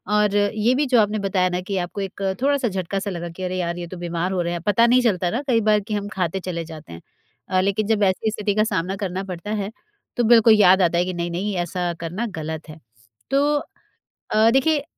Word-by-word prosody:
और 210 -1 +2
ये 210 +3 +2
भी 290 +3 +1
जो 250 -3 +4
आपने 210 +1 0
बताया 190 -2 +1
ना 180 - -2
कि 195 +1 -3
आपको 180 +3 -3
एक 195 0 -6 0.2
थोड़ा-सा 280 -2 +2
झटका-सा 195 +1 -3
लगा 175 -1 -5
कि 175 +3 -8
अरे! 185 0 -2
यार, 170 -1 -2
ये 175 -1 -5
तो 185 - -8
बीमार 175 +1 -2
हो 185 - 0
रहे 170 0 -2
हैं। 170 - -4
पता 205 +5 +3
नहीं 250 +1 +5
चलता 190 -7 +1
ना 235 +8 -2
कई 230 -3 +3
बार 210 0 +3
कि 210 +1 -6
हम 205 -1 -2
खाते 185 0 -1
चले 175 -2 -4
जाते 155 - -11
हैं 85 - -10 0.5
अ, 185 - +2
लेकिन 200 +2 0
जब 215 -2 +2
ऐसी 200 +3 +1
स्थिति 210 -1 -2
का 215 - +3
सामना 190 -3 -1
करना 190 -2 -3
पड़ता 190 +1 -6
है, 205 -1 -2 0.5
तो 240 - +2
बिल्कुल 230 -1 +6
याद 190 -3 +6
आता 170 -1 +2
है 175 - +2
कि 185 - -3
नहीं-नहीं, 175 +4 -3
ऐसा 175 0 -2
करना 175 +8 -3
गलत 160 0 -6
है। 155 +1 -10 0.5
तो 290 +2 +3 0.7
अ, 220 +1 +4
देखिए 280 +3 +2
195 Hz, 230 wpm, -22 LUFS, 175-215 Hz, 0.7 s, बिल्कुल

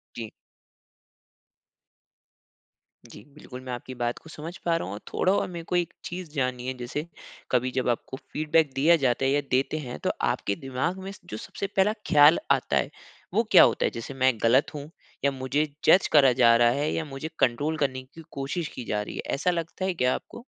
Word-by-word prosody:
जी। 115 -2 -6 2.8
जी, 105 - -13
बिल्कुल, 130 -4 -10
मैं 130 -1 -7
आपकी 125 +1 -7
बात 120 0 -2
को 160 - -15
समझ 165 +3 -8
पा 170 -1 +2
रहा - - -4
हूँ 95 - -5
और 100 - -6
थोड़ा 185 - +2
और - - 0
मेरे 170 -2 -7
को 180 - -2
एक 175 -2 0
चीज़ 180 -1 -6
जाननी 130 -4 -2
है, 130 - -1
जैसे 125 +5 -4 0.5
कभी 125 0 +1
जब 130 -1 -1
आपको 120 +2 -2
फीडबैक 155 -1 +2
दिया 155 +6 +5
जाता 125 +1 +1
है 135 - +2
या 145 +1 +2
देते 135 +4 +1
हैं 125 -5 -6
तो - - +1
आपके 100 - 0
दिमाग 135 - -3
में 195 - -6
जो - - -6
सबसे 220 -3 -5
पहला 200 +1 +2
ख्याल 150 0 +7
आता - - +2
है, - - 0 0.4
वो 225 - +3
क्या 185 - +9
होता - - +2
है? - - 0
जैसे 115 +4 -7
मैं 130 -1 +3
गलत 125 +5 +3
हूँ? 145 0 -7 0.4
या 140 - +4
मुझे 135 +3 -1 0.2
जज 180 +4 +6
करा 140 -4 +6
जा 120 -2 +5
रहा 120 0 +5
है 145 +4 0
या 160 - -2
मुझे 140 +2 -6
कंट्रोल 145 +6 +1
करने 130 -3 -1
की 140 +5 -14
कोशिश 140 +4 -3
की 125 - -5
जा 105 -1 -1
रही 105 - -7
है, - - -3
ऐसा 180 +6 +1
लगता 170 +2 -3
है 190 - 0
क्या 125 -6 +1
आपको? 235 - -10
140 Hz, 205 wpm, -26 LUFS, 125-165 Hz, 2.8 s, क्या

